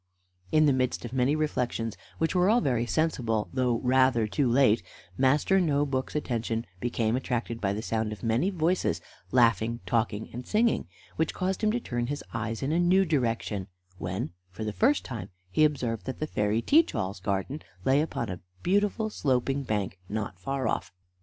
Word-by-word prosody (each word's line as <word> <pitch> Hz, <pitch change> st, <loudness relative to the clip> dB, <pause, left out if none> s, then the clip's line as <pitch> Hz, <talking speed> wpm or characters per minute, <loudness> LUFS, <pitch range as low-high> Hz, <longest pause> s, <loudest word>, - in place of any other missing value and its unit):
In 155 Hz, 0 st, +5 dB
the 145 Hz, -, +5 dB
midst 130 Hz, -1 st, 0 dB
of 120 Hz, -, -7 dB
many 130 Hz, +3 st, +2 dB
reflections, 125 Hz, -7 st, -1 dB, 0.2 s
which 160 Hz, -, 0 dB
were 180 Hz, +1 st, +4 dB
all 230 Hz, +3 st, +5 dB
very 120 Hz, -, 0 dB
sensible, 120 Hz, -10 st, 0 dB
though 125 Hz, -3 st, +2 dB
rather 130 Hz, -2 st, +4 dB
too 125 Hz, +5 st, +1 dB
late, 120 Hz, -3 st, +4 dB, 0.3 s
Master 145 Hz, -, +3 dB
No 145 Hz, -4 st, +2 dB
book's 130 Hz, -1 st, -2 dB
attention 115 Hz, -5 st, -1 dB
became 115 Hz, -1 st, 0 dB
attracted 120 Hz, -2 st, -2 dB
by 100 Hz, -1 st, +1 dB
the 105 Hz, +2 st, -4 dB
sound 110 Hz, -2 st, -1 dB
of 105 Hz, -, -8 dB
many 115 Hz, +11 st, +2 dB
voices 175 Hz, -, +1 dB, 0.3 s
laughing, 115 Hz, -1 st, +3 dB
talking, 110 Hz, -2 st, -1 dB
and 125 Hz, +1 st, -7 dB
singing, 230 Hz, +2 st, +2 dB, 0.3 s
which 160 Hz, 0 st, 0 dB
caused 190 Hz, +2 st, -1 dB
him 215 Hz, -, +4 dB
to 240 Hz, -, 0 dB
turn 120 Hz, -, -2 dB
his 145 Hz, +2 st, -4 dB
eyes 115 Hz, 0 st, -3 dB
in 135 Hz, -, 0 dB
a 165 Hz, -, +2 dB
new 185 Hz, +2 st, +4 dB
direction, 115 Hz, -, -1 dB, 0.3 s
when, 90 Hz, -1 st, -3 dB, 0.2 s
for 95 Hz, +4 st, -7 dB
the 105 Hz, -1 st, -2 dB
first 275 Hz, -, +2 dB
time, 105 Hz, -6 st, -6 dB, 0.2 s
he 155 Hz, -, +3 dB
observed 125 Hz, -7 st, 0 dB
that 130 Hz, -, -3 dB
the 155 Hz, -, -2 dB
fairy 105 Hz, -4 st, 0 dB
Teach 320 Hz, +3 st, +4 dB
all's 95 Hz, +1 st, -2 dB
garden 100 Hz, -, -2 dB, 0.2 s
lay 135 Hz, +2 st, +4 dB
upon 150 Hz, -6 st, -2 dB
a 90 Hz, -3 st, -5 dB, 0.2 s
beautiful 205 Hz, +3 st, +1 dB
sloping 135 Hz, -3 st, 0 dB
bank 105 Hz, -6 st, -2 dB
not 100 Hz, -4 st, -4 dB
far 135 Hz, +5 st, -2 dB
off. -, -, -2 dB
125 Hz, 180 wpm, -28 LUFS, 115-155 Hz, 0.3 s, In